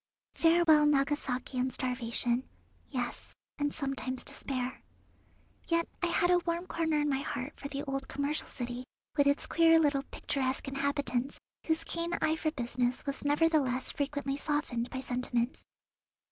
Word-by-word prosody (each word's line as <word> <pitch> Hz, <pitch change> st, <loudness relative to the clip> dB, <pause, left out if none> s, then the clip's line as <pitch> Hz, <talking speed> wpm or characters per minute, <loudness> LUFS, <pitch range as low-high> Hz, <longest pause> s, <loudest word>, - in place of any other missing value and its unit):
Farewell 325 Hz, -3 st, +5 dB
Nagasaki 275 Hz, -3 st, +1 dB
and 255 Hz, +1 st, +1 dB
starvation; 245 Hz, 0 st, 0 dB, 0.4 s
yes, 250 Hz, -3 st, -4 dB, 0.2 s
and 290 Hz, 0 st, +1 dB
sometimes 270 Hz, -3 st, -3 dB
despair. 255 Hz, -2 st, -3 dB, 0.9 s
Yet 335 Hz, 0 st, +2 dB
I 355 Hz, -, +2 dB
had 350 Hz, +1 st, +3 dB
a 355 Hz, -, +6 dB
warm 340 Hz, 0 st, -2 dB
corner 325 Hz, -3 st, 0 dB
in 295 Hz, -, +1 dB
my 270 Hz, -2 st, +1 dB
heart 275 Hz, 0 st, -4 dB
for 280 Hz, -, -5 dB
the 280 Hz, 0 st, -4 dB
old 275 Hz, -2 st, -3 dB
commercial 285 Hz, +2 st, -1 dB
city, 245 Hz, 0 st, -5 dB, 0.3 s
with 285 Hz, -2 st, +4 dB
its 285 Hz, +1 st, +3 dB
queer 330 Hz, 0 st, +5 dB
little 285 Hz, -3 st, +3 dB
picturesque 270 Hz, -1 st, -2 dB
inhabitants, 275 Hz, -1 st, -1 dB, 0.3 s
whose 320 Hz, 0 st, +1 dB
keen 335 Hz, +1 st, -2 dB
eye 315 Hz, 0 st, +2 dB
for 320 Hz, 0 st, 0 dB
business 245 Hz, -3 st, -1 dB
was 280 Hz, -1 st, -3 dB
nevertheless 290 Hz, -3 st, +2 dB
frequently 285 Hz, -1 st, -2 dB
softened 285 Hz, -6 st, -1 dB
by 260 Hz, -, -4 dB
sentiment. 245 Hz, -1 st, -1 dB
280 Hz, 145 wpm, -31 LUFS, 255-310 Hz, 0.9 s, a